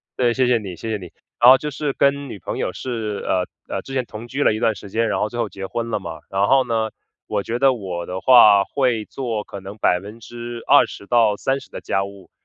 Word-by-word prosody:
对， 120 -2 +2
谢 130 +1 +2
谢 120 -2 +3
你， 95 -4 -7
谢 110 +5 -5
谢 110 - -1
你。 90 -4 -11 0.3
然 120 +1 +8
后 130 - +9
就 150 +1 -5
是 140 +1 -2
跟 140 0 +1
女 - - -7
朋 95 - -5
友 - - -1
是， 110 -5 -4
呃， 90 -1 +1 0.2
呃， - - -3
之 135 - -8
前 130 -2 0
同 110 +2 -9
居 140 +4 -1
了 - - +4
一 110 - -3
段 115 -2 +2
时 100 -1 -11
间， 115 0 +1
然 - - 0
后 105 - +1
最 120 +2 -6
后 110 -3 -1
结 95 +1 -7
婚 115 +4 -4
了 105 -2 -1
嘛。 85 -4 -7
然 100 +1 +1
后 135 +2 +5
呢， 110 -2 -1 0.3
我 - - -1
觉 115 +4 -3
得 135 +1 +4
我 90 -6 -5
的 95 +1 -5
话 105 -5 +7
会 125 -6 0
做 115 -6 -4
可 100 - -9
能 95 +2 -9
20%-30% 115 +3 0
的 - - -7
家 95 - 0
务， 100 -1 -12
115 Hz, 245 characters per minute, -21 LUFS, 100-125 Hz, 0.3 s, 后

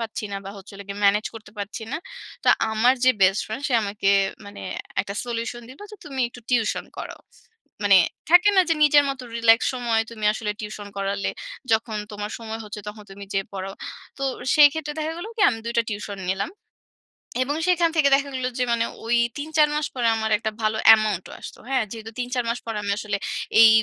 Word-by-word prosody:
পাচ্ছি 225 -1 -4
না - - -2
বা 195 - -6
হচ্ছে 195 +1 -12
হলো 200 0 -9
গিয়ে 200 +1 -5
ম্যানেজ 205 +2 +4
করতে 220 -2 -11
পারছি 205 +3 -5
না। - - 0 0.5
তো - - +3 0.2
আমার 235 +4 +4
যে 255 - +7
বেস্ট 195 +2 +4
ফ্রেন্ড 240 +6 -5
সে - - -3
আমাকে 200 -1 -1 0.4
মানে 200 - -10 0.4
একটা 200 +1 -6
solution 235 0 -4
দিলো 270 +10 -12
যে, 425 - -10
"তুমি 270 -3 -5
একটু 245 - -13
tuition 230 -4 +1
করাও।" - - -7 0.6
মানে 200 -1 +6 0.3
থাকে 360 +3 +7
না - - +8
যে, 325 - +3
"নিজের 295 -1 +6
মত 270 -1 -3 0.2
relax 230 0 +5
সময় 235 -3 +1
তুমি 215 -2 -7
আসলে 215 -1 -3
tuition 210 -1 -7
করালে 195 0 -1 0.4
যখন 220 -1 +1 0.2
তোমার 210 +1 -5
সময় 225 0 -6
হচ্ছে 210 0 -7
তখন 210 0 -9
তুমি 200 +1 -9
যেয়ে 195 0 -1
পড়াও।" 195 +1 -5 0.4
তো - - -6 0.3
সেই 295 -1 +9
ক্ষেত্রে 305 -2 -4
দেখা 310 +1 -2
গেলো 380 - -6
কি - - -4
আমি 225 - -4
২ 235 - -3
টা - - +5
টিউশন 205 -1 -5
নিলাম 195 - -2 0.9
এবং 290 +3 -2
সেখান 345 -2 +3
থেকে 290 -3 +4
দেখা 280 0 -1
গেলো 255 -1 -1
যে - - +3
মানে 230 0 +1 0.2
ঐ - - -9 0.3
৩-৪ 305 +1 +2
মাস 300 -1 0
পরে 240 -2 +1
আমার 220 0 -2
একটা 220 0 -3
ভালো 215 0 +1 0.2
amount 215 -4 -1
ও - - -10
আসতো, - - -10
হ্যাঁ? 260 -4 +2
যেহেতু 225 -1 -7
৩-৪ 245 0 -1
মাস 235 - -1
পরে 225 -2 -3
আমি 200 - -1
আসলে 205 -1 -2 0.4
এই 225 - +10
225 Hz, 205 wpm, -24 LUFS, 205-260 Hz, 0.9 s, এই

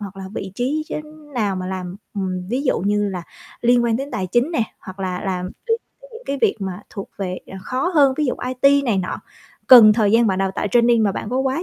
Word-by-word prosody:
hoặc 200 -1 -8
là 190 - -7
vị 190 -1 -5
trí, 285 +7 -1
chư - - -4 0.4
nào 205 -5 0
mà 185 0 -4
làm 185 0 -5 0.2
ừm, 185 -2 -3
ví 255 +4 -1
dụ 270 - +1
như 205 +1 +1
là 180 -2 -5 0.4
liên 240 0 +4
quan 230 -1 +2
đến 275 +2 -5
tài 190 -3 -2
chính 240 - +1
nè, 320 -9 +1 0.2
hoặc 190 -1 -10
là 185 -1 -2
làm 185 -1 -2 0.2
tới 455 0 +2 0.2
tới - - -15
những 455 - -10
cái 280 - -2
việc - - +3
mà 190 +1 -5
thuộc 195 - -7
về, 185 -2 -3
à, 190 - -9
khó 260 - -1
hơn, 275 -3 +5
ví 300 -2 +1
dụ 250 - 0
IT 275 +2 +3
này 215 -6 +1
nọ. 180 - -2 0.5
Cần 225 -4 +10
thời 210 -2 +2
gian 230 0 +5
bạn 190 -2 +1
đào 195 0 +1
tạo - - -1
training 235 -1 +4
mà 200 -2 +2
bạn 210 - -5
có 255 - -1
quá 265 +5 0
215 Hz, 255 wpm, -21 LUFS, 190-255 Hz, 0.5 s, Cần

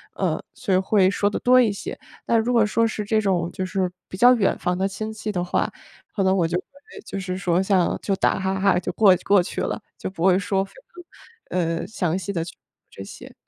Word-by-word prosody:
呃， - - -1
所 200 -6 -2
以 - - +5
会 190 0 +3
说 205 0 +1
得 - - -3
多 255 +1 +5
一 235 -4 +4
些。 200 - -7 0.3
但 230 - +3
如 235 +3 0
果 230 -3 +4
说 230 +2 +2
是 215 -1 -4
这 215 +1 +1
种 180 -5 0
就 185 - -4
是 185 -1 -1 0.2
比 - - -8
较 245 +6 +6
远 215 -6 +1
房 180 0 -1
的 190 +1 +1
亲 215 +2 -5
戚 220 0 -6
的 180 -4 -1
话， 180 - 0 0.5
可 195 - +1
能 190 0 +3
我 170 -3 +2
就 170 +2 -1
会 285 - -12
就 195 - -5
是 185 -1 -4
说 180 -1 +1
像 190 -3 +1
就 195 - 0
打 - - +1
哈 190 0 -1
哈 195 -2 +3
就 180 0 -4
过 200 0 +6
过 200 -3 +4
去 - - -6
了， - - -3 0.2
就 - - -5
不 185 -3 -6
会 185 0 +5
说， 195 -1 0
非 195 - -12 0.8
常， 185 - 0
呃， 165 -1 -1
详 180 -5 -1
细 190 +1 -4
地 165 -4 -2
去 170 - -9
说 - - -33 0.3
这 95 - -9
些。 100 - -11
190 Hz, 265 characters per minute, -23 LUFS, 180-215 Hz, 0.8 s, 较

